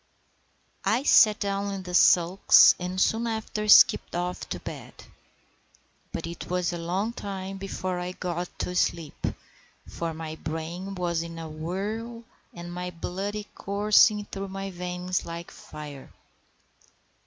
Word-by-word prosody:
I 240 +5 +1
sat 215 -6 +6
down 200 0 -1
in 190 - -6
the 180 -1 -7
sulks, 180 +1 +6
and 180 +1 -3
soon 225 +4 +2
after 220 -1 -3
skipped 210 - +6
off 180 +1 -3
to - - -4
bed; - - -9 1.2
but 165 - -4
it 170 0 -7
was 180 -1 0
a 170 - -4
long 190 +7 -2
time 195 -3 -6
before 185 -2 -4
I 180 +1 -4
got 175 -1 -4
to 180 - -3
sleep, 165 -4 -1 0.6
for 170 -1 -4
my 160 0 -6
brain 165 +5 -5
was 175 -2 -1
in 165 0 -7
a 165 -1 -6
whirl, 205 +9 -5 0.3
and 175 0 -8
my 180 0 -4
blood 195 +4 -4
coursing 210 +1 +3
through 195 0 -6
my 195 0 -5
veins 180 0 -3
like 170 +1 -7
fire. 145 -3 -10
180 Hz, 140 wpm, -27 LUFS, 170-200 Hz, 1.2 s, sat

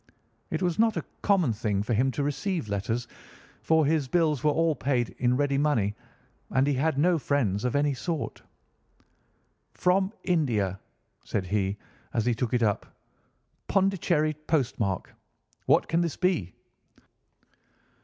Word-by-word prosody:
It 160 +3 -2
was 175 +2 0
not 225 -1 +3
a - - -3 0.2
common 180 - +3
thing 105 -2 -1
for 115 - -1
him 125 +5 +2
to 145 - -1
receive 160 - -2
letters, 110 +4 -2 0.5
for 160 -1 +3
his 150 -2 +1
bills 155 -2 +1
were 150 - +4
all 165 +2 +2
paid 130 -4 0
in 125 0 +2
ready 140 -1 +1
money, 120 -9 +1 0.6
and 130 +2 +2
he 145 - +1
had 140 +2 0
no 170 +3 +3
friends 115 -9 0
of 125 - 0
any 145 0 +2
sort. 160 +4 -4 1.3
'From 190 +2 +2
India!' 115 - 0 0.4
said 95 - -2
he 100 +1 -1 0.4
as 115 -2 +1
he 120 - +3
took 120 0 -2
it 120 - +2
up, 105 -2 0 0.8
'Pondicherry 180 -5 +2
postmark! 115 - -1 0.5
What - - +4
can 165 +1 +1
this 170 -3 -1
be? 180 - 0
140 Hz, 145 wpm, -27 LUFS, 115-165 Hz, 1.3 s, were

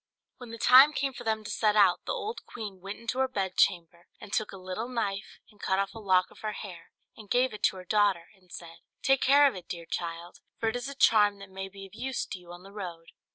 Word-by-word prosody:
When 245 -2 -10
the 230 - -7
time 265 +6 +8
came 275 -2 -1
for 245 - -9
them 220 -1 -1
to 210 - -6
set 215 -1 +2
out, 200 -4 +4
the - - 0
old 465 -2 -4
queen 205 -5 -8
went 195 +2 -6
into 230 +3 -4
her 265 - +3
bed 195 -7 -3
chamber, 170 -1 +1
and 205 - -11
took 215 - 0
a 195 - -9
little 185 +6 -5
knife, 205 -5 -3
and 210 - -21
cut 190 - +1
off 195 0 -1
a 225 - -9
lock 185 -3 +2
of - - -17
her 215 -1 -4
hair, 180 -5 -9 0.3
and 215 -3 -13
gave 250 0 +2
it 210 - -8
to - - +2
her 185 -1 -9
daughter, 195 -3 +2
and 185 -3 -26
said, 165 -1 -10 0.3
"Take 270 -1 +3
care 285 +2 +6
of 275 - +4
it, 180 -2 -9
dear 170 -1 -6
child; 170 +1 -5 0.2
for 225 - +1
it 220 - -4
is 245 +2 -4
a 280 - -8
charm 210 -6 +4
that 195 -1 -12
may 190 0 -6
be 195 0 -11
of 195 - -16
use 255 +3 -3
to 190 - -7
you 175 -1 -14
on 175 +1 -11
the 195 - -13
road." 175 -5 -8
205 Hz, 265 wpm, -29 LUFS, 185-230 Hz, 0.3 s, time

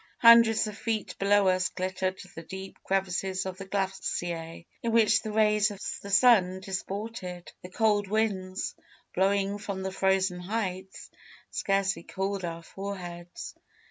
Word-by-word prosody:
Hundreds 230 -1 +7
of 210 -1 -5
feet 220 -2 -3
below 200 0 +4
us 185 0 +2
glittered 185 0 -2 0.2
the 165 - -7
deep 190 +3 -8
crevasses 190 0 -1
of 190 0 -5
the 195 - -6
glacier, 175 -4 -3 0.2
in 230 - -1
which 225 -2 +4
the 215 - -5
rays 210 0 +3
of 205 -2 -8 0.2
the 200 - -8
sun 195 -4 +5
disported. 190 -1 -5
The 180 - -9
cold 205 0 +2
winds, 195 -3 -1 0.4
blowing 195 +2 +1
from 200 -2 -4
the 190 - -2
frozen 190 -1 +1
heights, 190 -1 -4 0.4
scarcely 195 -3 0
cooled 195 +2 -3
our 170 -1 -4
foreheads. 175 -3 -7
195 Hz, 140 wpm, -28 LUFS, 185-205 Hz, 0.4 s, Hundreds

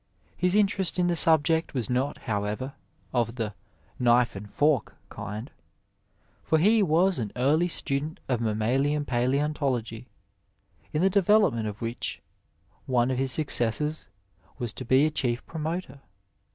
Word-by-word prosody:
His 180 +1 +1
interest 195 -4 +2
in 180 - +2
the 175 -1 +1
subject 160 -1 +3
was 120 -5 -1
not, 130 +3 -1
however, 105 +5 -3 0.4
of 120 -1 0
the 110 -4 -3 0.3
" - - -33
knife 120 -1 +3
and 105 +1 -8
fork 145 -1 +1
" - - -35
kind, 110 +6 -7 0.9
for 160 - +2
he 210 +7 +4
was 180 0 +2
an 110 -4 -3
early 150 +7 +2
student 150 -2 -2
of 125 -3 0
mammaUan 125 +7 0
palaeontology, 130 -2 -1 0.8
in 155 +3 0
the 190 - +5
development 195 - +3
of 105 0 -7
which 115 +2 -4 0.7
one 125 0 +2
of 130 - -1
his 135 -1 +1
successors 150 +1 +1 0.5
was 120 -4 -4
to 130 - -8
be 130 +4 +4
a 155 - 0
chief 125 -5 -2
promotor. 160 -3 -5
135 Hz, 145 wpm, -26 LUFS, 120-160 Hz, 0.9 s, the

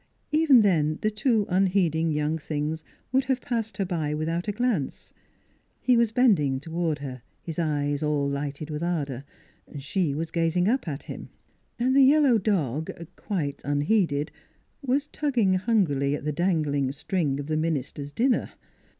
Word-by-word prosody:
Even 300 -6 +6
then, 155 -6 +2
the 215 - +2
two 215 0 +1
unheeding 180 -4 +2
young 150 +1 0
things 155 +1 -3 0.3
would 265 +1 +2
have 265 -1 0
passed 230 -3 -3
her 195 - 0
by 160 -5 -2
without 165 +4 -2
a - - +1
glance 210 - -2 0.7
he 250 - +3
was 235 -2 +3
bending 180 - +3
toward 165 0 -2
her, 130 -3 -7 0.2
his 165 -1 -5
eyes 145 -3 0
all 150 -2 +1
lighted 140 +2 -4
with 150 +1 -4
ardor; 145 -7 -2 0.5
she 145 +2 -1
was 160 +2 -3
gazing 170 +2 +1
up 250 -2 +1
at 145 -2 -4
him; - - -8 0.5
and 255 +2 +1
the 275 - +7
yellow 270 -3 +5
dog, 160 - -1 0.3
quite 150 -9 -3
unheeded, 145 +1 +1 0.5
was 275 +1 0
tugging 255 -10 +1
hungrily 180 - +1
at - - -7
the 150 - 0
dangling 150 -6 0
string 145 0 -1
of 145 - -4
the 155 +1 -2
minister's 145 -2 -2
dinner. 245 - +1
165 Hz, 155 wpm, -26 LUFS, 145-215 Hz, 0.7 s, the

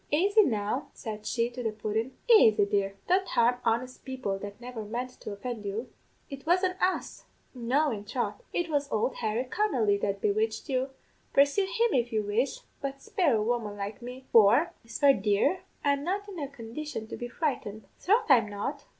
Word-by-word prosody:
Aisy 395 +8 +5
now,' 215 - -1
said 215 -3 -6
she 235 0 +1
to 250 +1 -6
the 225 -2 -1
pudden, 220 +4 -3
'aisy, 220 - +6
dear; 200 -1 0
don't 375 +1 +3
harm 240 +1 +3
honest 245 +3 -1
people 255 -8 -3
that 205 +2 -8
never 245 -2 -6
meant 240 +4 -4
to 230 - -9
offend 220 +2 -5
you. 210 +5 -4 0.4
It 275 -2 -8
wasn't 365 +2 +1
us 370 - -1 0.3
no, 265 +5 +1
in 205 -2 -5
troth, 245 - -3
it 345 - -1
was 290 -3 -1
ould 220 +4 0
Harry 225 +1 -1
Connolly 250 - +1
that 200 -1 -1
bewitched 220 +3 0
you; 260 0 0 0.4
pursue 285 +8 +4
him 450 +4 +1
if 240 -1 +1
you 215 -1 0
wish, 220 +6 -1 0.2
but 275 0 -4
spare 305 - +1
a 215 - +1
woman 220 -3 -1
like 200 +2 -5
me; 250 +2 -8
for, 230 +9 +6
whisper, 275 +4 +3
dear, 210 - +1 0.2
I'm 280 -1 +2
not 395 +5 -2
in 385 -4 -7
a 285 - -3
condition 260 -1 -6
to - - -7
be 240 - -5
frightened 240 -6 -3 0.2
troth 425 +6 +3
I'm 235 -7 +5
not.' 205 0 -4
245 Hz, 185 wpm, -29 LUFS, 215-285 Hz, 0.4 s, aisy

